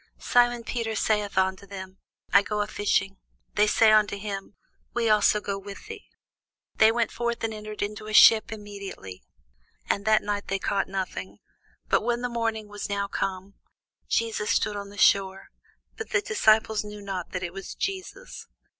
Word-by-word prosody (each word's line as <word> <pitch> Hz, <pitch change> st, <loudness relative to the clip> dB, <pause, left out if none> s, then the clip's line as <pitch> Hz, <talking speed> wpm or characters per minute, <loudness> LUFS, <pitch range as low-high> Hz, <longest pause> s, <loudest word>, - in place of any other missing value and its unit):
Simon 240 Hz, -1 st, +2 dB
Peter 225 Hz, -1 st, -3 dB
saith 210 Hz, -2 st, 0 dB
unto 190 Hz, +1 st, 0 dB
them, 190 Hz, -1 st, -9 dB, 0.3 s
I 200 Hz, -, +8 dB
go 210 Hz, 0 st, -2 dB
a -, -, 0 dB
fishing. 195 Hz, -2 st, 0 dB, 0.4 s
They 210 Hz, +1 st, +3 dB
say 220 Hz, +1 st, +5 dB
unto 210 Hz, -1 st, +3 dB
him, 200 Hz, -1 st, -6 dB, 0.4 s
We 230 Hz, -2 st, +2 dB
also 210 Hz, 0 st, +4 dB
go 200 Hz, -1 st, -4 dB
with 200 Hz, -, -10 dB
thee. 445 Hz, -1 st, -10 dB, 0.7 s
They 220 Hz, 0 st, +6 dB
went 235 Hz, 0 st, 0 dB
forth, 235 Hz, -1 st, -3 dB
and 225 Hz, -1 st, -1 dB
entered 215 Hz, -1 st, -6 dB
into 210 Hz, +1 st, -5 dB
a 215 Hz, -, -6 dB
ship 220 Hz, 0 st, +7 dB
immediately; 200 Hz, -, -8 dB, 0.7 s
and 200 Hz, -, 0 dB
that 220 Hz, 0 st, +4 dB
night 205 Hz, 0 st, -3 dB
they 195 Hz, -, -1 dB
caught 195 Hz, 0 st, -1 dB
nothing. 185 Hz, -, -5 dB, 0.5 s
But -, -, +3 dB
when 240 Hz, +2 st, -1 dB
the 245 Hz, -, -1 dB
morning 225 Hz, -2 st, -2 dB
was 205 Hz, 0 st, -6 dB
now 200 Hz, 0 st, -1 dB
come, 195 Hz, 0 st, -4 dB, 0.6 s
Jesus 225 Hz, -2 st, 0 dB
stood 210 Hz, -, +1 dB
on 200 Hz, 0 st, -6 dB
the 205 Hz, -, -13 dB
shore: 195 Hz, -1 st, +3 dB, 0.5 s
but 445 Hz, -, -6 dB
the 405 Hz, -, +2 dB
disciples 220 Hz, -, +3 dB
knew 210 Hz, 0 st, -9 dB
not 190 Hz, -3 st, -5 dB
that 185 Hz, 0 st, -4 dB
it 175 Hz, -1 st, -4 dB
was 195 Hz, 0 st, -8 dB
Jesus. 390 Hz, +5 st, -5 dB
210 Hz, 170 wpm, -26 LUFS, 195-220 Hz, 0.7 s, I